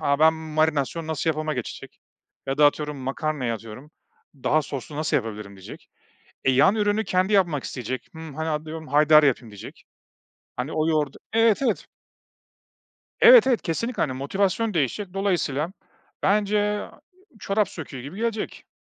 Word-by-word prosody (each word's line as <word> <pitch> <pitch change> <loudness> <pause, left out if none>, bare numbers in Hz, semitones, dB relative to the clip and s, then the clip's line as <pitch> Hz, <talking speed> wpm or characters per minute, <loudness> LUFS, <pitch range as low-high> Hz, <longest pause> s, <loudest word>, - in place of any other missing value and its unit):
"A, 140 -2 +1
ben 160 +1 +5
marinasyon 155 0 -1
nasıl 160 +1 0
yapıma 155 0 -2
geçecek." 125 -3 -7 0.5
ya 135 +1 -2
da 150 - +7
atıyorum, 150 0 -1
makarnaya 135 -1 -2
atıyorum, 115 +6 -10 0.4
"Daha 150 +3 +1
soslu 140 +1 -7
nasıl 155 +1 0
yapabilirim?" 105 -5 -5
diyecek. 95 - -12 0.6
E, - - +4
yan 140 +11 +5
ürünü 210 0 +1
kendi 185 +1 +1
yapmak 175 -9 +2
isteyecek, 130 0 -5
"Hımm, 160 -3 -9
hani, 160 +2 -3
atıyorum, 155 +1 -4
haydari 150 +1 +6
yapayım 125 -4 0
diyecek. 105 -2 -11 0.7
Hani, 125 +5 -4
o 155 0 0
yoğurdu 150 -4 0 0.2
Evet, 225 +1 +4
evet. 270 - 0 1.4
Evet, - - +9
evet. 250 -4 +2
Kesinlikle, 230 +8 -2
hani, 130 - 0
motivasyon 195 - -1
değişecek, 175 - -1
dolayısıyla 180 -4 -1 0.5
bence 210 +1 +2 0.2
a - - -11 0.4
çorap 200 -1 0
söküğü 135 -5 -8
gibi 145 +9 -9
gelecek. 225 -1 -3
155 Hz, 145 wpm, -24 LUFS, 135-190 Hz, 1.4 s, Evet